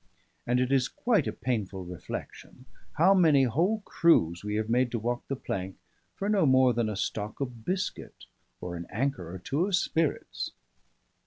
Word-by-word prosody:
and 125 +1 +2
it 125 +1 0
is 135 -2 +3
quite 235 -4 +1
a - - 0
painful 105 -6 -3
reflection 90 +7 -8 0.3
how 180 +6 +5
many 160 -8 +5
whole 175 - +1
crews 85 - +3
we 105 0 -2
have 110 0 -1
made 125 +2 +2
to 120 - -2
walk 120 +2 -2
the 135 - -2
plank 95 -6 -5 0.4
for 200 - -3
no 205 -3 +3
more 130 -3 +5
than 115 -1 0
a 105 - -3
stock 105 +1 -3
of 125 -5 -5
biscuit 185 +1 -4 0.4
or 90 -1 -5
an 85 0 -7
anker 110 -8 -2
or 95 - -6
two 145 - -1
of 200 - +2
spirits. 165 -3 -1
125 Hz, 175 wpm, -28 LUFS, 105-160 Hz, 0.4 s, how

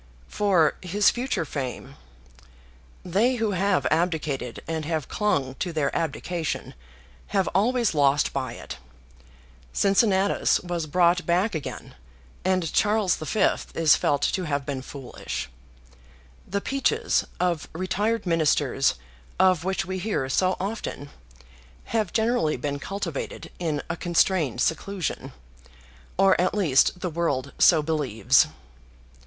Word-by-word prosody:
"For 185 - +2
his 195 +3 +3
future 245 -8 -2
fame. 135 -4 -5 1.1
They 210 +9 +2
who 225 -3 0
have 190 -6 +1
abdicated 155 -7 -1
and 160 -1 -2
have 155 -2 -2
clung 145 -12 0
to 180 - -2
their 155 -3 -1
abdication 165 0 -3 0.5
have 195 -2 0
always 235 +4 +1
lost 145 -1 +2
by 130 -4 -3
it. - - -9 0.9
Cincinnatus 195 -1 +3
was 175 -3 -3
brought 175 +3 +2
back 185 +5 +2
again, 155 -3 -6 0.5
and 185 -4 0
Charles 210 -3 +2
V. 160 +7 -3 0.4
is 160 -2 +5
felt 145 -1 0
to 185 - 0
have 140 -3 -2
been 135 -2 -3
foolish. 135 -1 -6 1.0
The 200 +1 -2
peaches 275 - +1 0.2
of 175 -4 0
retired 195 +6 -1
ministers 150 -5 +2 0.4
of 185 -3 +4
which 190 0 -1
we 185 +1 -4
hear 185 -9 -1
so 185 +6 +1
often 190 -8 -5 0.7
have 215 -3 -1
generally 220 -9 +1
been 145 -1 -3
cultivated 180 -4 -5
in 155 -4 -2
a 170 - -2
constrained 170 -7 +1
seclusion; 185 +4 -2 0.9
or 190 -1 +4
at 185 - +1
least 180 -2 +3
the 180 - -2
world 140 -5 -1
so 160 -4 +6
believes." 135 -3 +2
175 Hz, 120 wpm, -25 LUFS, 150-195 Hz, 1.1 s, so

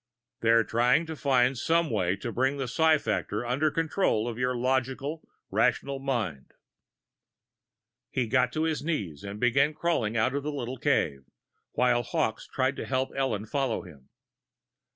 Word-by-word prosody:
"They're 115 0 +4
trying 125 +8 +2
to 160 0 -6
find 130 -2 +2
some 165 +4 +1
way 95 -4 +1
to 115 +4 -5
bring 130 +4 0
the 135 -2 -2
psi 160 +5 +4
factor 120 - -2
under 135 +6 +1
the - - -15
control 160 - +1
of 120 - -3
your 125 0 0
logical, 130 +4 -1 0.2
rational 140 -1 +1
mind." 115 - -3 1.6
He 130 - 0
got 125 +2 +2
to 155 - 0
his 160 -2 -1
knees 100 - -3
and 100 +1 -6
began 135 +5 +3
crawling 120 -11 0
out 130 +4 +2
of 140 - -1
the 150 +2 -3
little 130 -2 -4
cave, 75 - 0 0.5
while 125 -1 +3
Hawkes 110 -1 -2
tried 130 +1 0
to - - -5
help 130 0 0
Ellen 130 -6 -1
follow 135 0 -1
him. 70 -7 -15
130 Hz, 160 wpm, -28 LUFS, 115-140 Hz, 1.6 s, They're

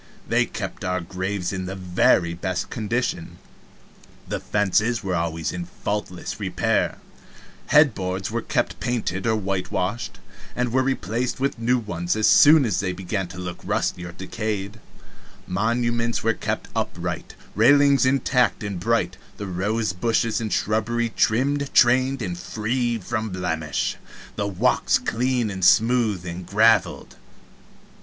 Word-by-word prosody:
They - - +2
kept - - -6
our 90 0 0
graves 95 +1 -3
in 95 -1 -4
the 95 - -5
very 90 -2 +2
best 90 +1 -3
condition; 110 -5 -2 0.9
the - - -3
fences 105 +3 +1
were 95 -2 -2
always 85 -2 -1
in 90 -1 -5
faultless 90 0 -4
repair, - - 0 0.7
head 150 -4 +6
boards 95 0 -3
were 115 +1 -1
kept - - -1
painted 110 -5 -2
or 110 - +3
whitewashed, 100 +2 -2 0.4
and 125 -1 -1
were 130 - +4
replaced 125 -2 -1
with 135 -2 -1
new 120 +2 +2
ones 85 -6 -2
as 110 0 +1
soon 150 -1 +7
as 110 - 0
they 95 -3 -1
began 95 +1 -3
to 90 - -11
look 90 -1 -6
rusty 90 - -1
or 90 - -6
decayed; 105 +3 -4 0.7
monuments 115 +4 0
were 115 +1 +3
kept - - -3
upright, - - -3 0.2
railings 140 +3 +5
intact 130 -3 +2
and 100 -3 -4
bright, 115 +5 0 0.2
the 100 - -5
rose 100 +3 -1
bushes 115 +4 0
and 110 -2 -3
shrubbery 115 +2 0
trimmed, 140 +5 +1
trained, 130 +1 +4
and 90 -2 -4
free 120 +4 -1
from 110 +1 -3
blemish, 80 -5 -2 0.4
the 100 - -1
walks 95 -3 +2
clean 120 -1 0
and 95 -1 -5
smooth 110 -3 +3
and 85 0 -6
graveled. 105 -3 +2
105 Hz, 140 wpm, -23 LUFS, 90-120 Hz, 0.9 s, soon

